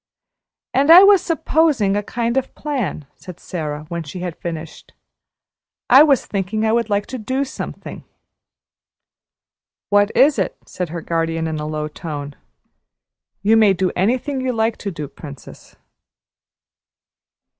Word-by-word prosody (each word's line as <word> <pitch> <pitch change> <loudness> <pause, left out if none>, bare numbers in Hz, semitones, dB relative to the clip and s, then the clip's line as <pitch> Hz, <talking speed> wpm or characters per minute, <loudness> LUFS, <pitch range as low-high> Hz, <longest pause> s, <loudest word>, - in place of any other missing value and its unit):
"And 275 +4 +2
I 350 +3 +10
was 395 -2 +6
`supposing' 320 - +1
a 205 - 0
kind 235 +3 -2
of 265 - -2
plan," 260 - -3
said 180 -2 -12
Sara, 150 -4 -5
when 170 -1 -3
she 160 +3 -8
had 175 -2 -4
finished; 165 -2 -8 1.0
"I 265 +3 +9
was 285 -5 +4
thinking 210 +2 -2
I 220 - +2
would 230 -1 0
like 205 0 0
to 260 - -7
do 260 +5 -2
something." 265 - -8 1.9
"What 205 0 +4
is 280 +1 +5
it?" - - -2
said 180 -3 -5
her 170 +1 -5
guardian 165 0 -2
in 160 -1 -3
a 150 - -4
low 155 0 -3
tone. 145 -2 -7 1.1
"You 215 +2 +4
may 215 -3 +5
do 185 0 -1
anything 255 +8 0
you 255 -1 -1
like 225 0 0
to 200 - -5
do, 150 -6 -6
Princess." 140 -1 -12
205 Hz, 145 wpm, -19 LUFS, 165-260 Hz, 1.9 s, I